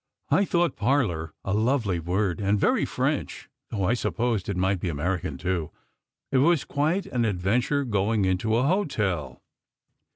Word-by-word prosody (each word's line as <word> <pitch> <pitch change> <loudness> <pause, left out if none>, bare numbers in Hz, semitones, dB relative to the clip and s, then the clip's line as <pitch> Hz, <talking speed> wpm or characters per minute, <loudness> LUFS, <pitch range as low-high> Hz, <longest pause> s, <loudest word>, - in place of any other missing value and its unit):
" - - -47
I 200 - +3
thought 175 -4 +1
"parlour" 105 - 0
a 95 - -1
lovely 110 -4 +1
word, 90 +3 -1
and 100 +1 +2
very - - +2
French, - - -2 0.2
though 100 -4 -2
I 100 +6 +2
supposed 115 -4 -1
it 100 - -2
might 95 +1 +1
be 90 - -2
American, 90 +4 -2
too. 90 -4 -2 0.6
It 135 - +3
was 165 +2 +3
quite 155 +7 0
an 120 -2 -1
adventure 115 +8 +1
going 105 -2 +1
into 95 +4 +1
an 125 - +2
hotel. 105 - -1
105 Hz, 160 wpm, -26 LUFS, 90-130 Hz, 0.6 s, I